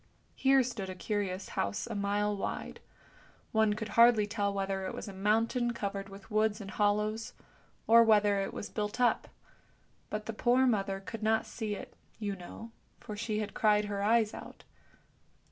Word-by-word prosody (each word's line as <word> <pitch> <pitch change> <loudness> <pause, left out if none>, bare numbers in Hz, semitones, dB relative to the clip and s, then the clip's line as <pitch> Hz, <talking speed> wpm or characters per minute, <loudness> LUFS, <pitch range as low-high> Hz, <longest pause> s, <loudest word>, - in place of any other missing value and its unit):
Here 270 0 +4
stood 230 -6 -4
a 185 - -5
curious 195 -1 -3
house 100 0 -2
a - - -6
mile 205 +1 0
wide; 195 - -4 0.7
one 220 -1 +3
could 220 0 -5
hardly 230 -1 +6
tell 205 -1 -1
whether 195 -1 -2
it - - -5
was - - -6
a 200 - -7
mountain 225 +5 +1
covered 200 -2 -4
with 195 +2 -13
woods 215 0 +2
and 200 -2 -7
hollows, 210 +2 0 0.5
or 230 +1 +7
whether 210 -3 +4
it 195 - -3
was - - -6
built 210 +2 -3
up; 245 -1 +2 0.8
but 210 0 -4
the 225 - -4
poor 245 +4 +3
mother 195 -5 +1
could 225 +3 -7
not 220 +1 +2
see 215 -3 -4
it, - - -10 0.2
you 205 -3 -3
know, 195 +5 -10 0.3
for 210 - -7
she 215 0 -2
had 210 - -5
cried 210 -1 +3
her 200 -1 -3
eyes 220 +1 +3
out. - - -10
210 Hz, 175 wpm, -31 LUFS, 200-225 Hz, 0.8 s, or